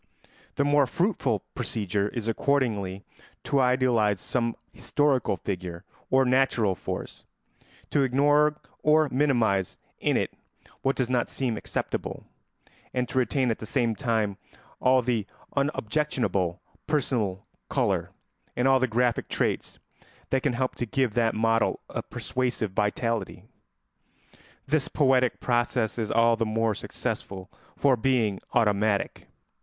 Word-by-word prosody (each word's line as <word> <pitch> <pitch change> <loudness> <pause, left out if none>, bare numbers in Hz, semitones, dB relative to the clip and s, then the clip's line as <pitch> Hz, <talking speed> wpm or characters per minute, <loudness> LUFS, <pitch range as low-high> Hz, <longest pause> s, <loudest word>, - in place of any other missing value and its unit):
The 140 - +2
more 145 -1 +4
fruitful 140 - 0
procedure 100 -1 -1
is 115 -1 -4
accordingly 110 -6 0 0.4
to 140 - +1
idealise 125 -6 +3
some 115 +1 -1 0.2
historical 140 -8 +1
figure 90 -1 -5 0.3
or 130 0 +4
natural 125 -5 +3
force, - - -6 0.7
to 145 - +3
ignore 145 +3 +3 0.3
or 155 0 +4
minimise 120 -9 +1 0.2
in - - +2
it - - -1 0.5
what 135 +1 +1
does 130 - 0
not 125 -1 0
seem 125 -4 -1
acceptable, - - -4 0.7
and 125 -1 0
to 130 - +1
retain 130 -1 +1
at 110 - -3
the 110 - -7
same 120 -2 +1
time 110 -5 -1 0.4
all 130 0 +4
the 115 -4 0 0.3
unobjectionable 130 - 0 0.3
personal 115 -10 0 0.2
colour - - 0 0.5
and 125 +2 +2
all 135 0 +5
the 130 - +2
graphic 120 +1 0
traits - - -1 0.5
that 135 - +2
can 140 -2 +1
help 130 +1 -1
to 120 - -2
give 130 -1 0
that 115 -1 +2
model 115 +1 +2
a - - -2
persuasive 125 -5 -2
vitality. 110 +3 -1 1.2
This 150 0 +1
poetic 130 -4 +2
process 120 -1 0
is 110 -2 -2
all 115 +1 +4
the 115 - +1
more 110 0 +1
successful 95 -1 -5 0.3
for 140 -2 +4
being 115 -5 +1
automatic. 105 -2 +1
120 Hz, 130 wpm, -27 LUFS, 110-135 Hz, 1.2 s, all